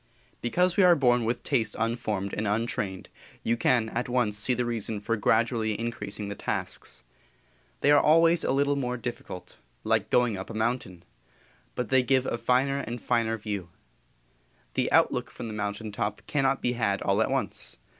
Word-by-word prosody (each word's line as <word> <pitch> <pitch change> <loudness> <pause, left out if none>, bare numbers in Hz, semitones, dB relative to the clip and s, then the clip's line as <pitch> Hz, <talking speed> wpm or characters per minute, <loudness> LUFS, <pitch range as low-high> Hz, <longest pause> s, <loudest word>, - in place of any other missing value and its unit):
Because 180 +9 +1
we 200 - +6
are 180 -1 +7
born 125 -5 +3
with 120 +1 -1
taste 115 -7 0
unformed 110 -4 -2
and 105 - -1
untrained 105 -3 -2 0.4
you 115 - +2
can 120 -1 +2
at 120 +2 -3
once 120 -4 +1
see 115 +4 0
the 125 0 -1
reason 115 -2 -2
for 115 +3 -1
gradually 110 0 +1
increasing 105 -3 -4
the 100 - -4
tasks. - - -4 0.8
They 145 - +4
are 145 - +7
always 165 +2 +4
a - - +1
little 140 +1 +2
more 125 -2 -2
difficult 120 -6 -7 0.3
like - - +1
going 120 -5 +2
up 95 - -7
a - - -7
mountain 110 -6 -2 0.7
but 125 -3 -3
they 130 -1 +5
give 130 +1 +2
a 120 - -2
finer 135 +3 +2
and 120 -3 -5
finer 115 0 0
view. 100 -5 -5 1.0
The - - 0
outlook - - +3
from - - -8
the - - -5
mountain 105 +1 -3
top 105 -1 -3
cannot 135 -2 +1
be 125 - +2
had 100 -5 0
all - - +2
at - - +1
once. - - -3
115 Hz, 175 wpm, -27 LUFS, 105-125 Hz, 1.0 s, are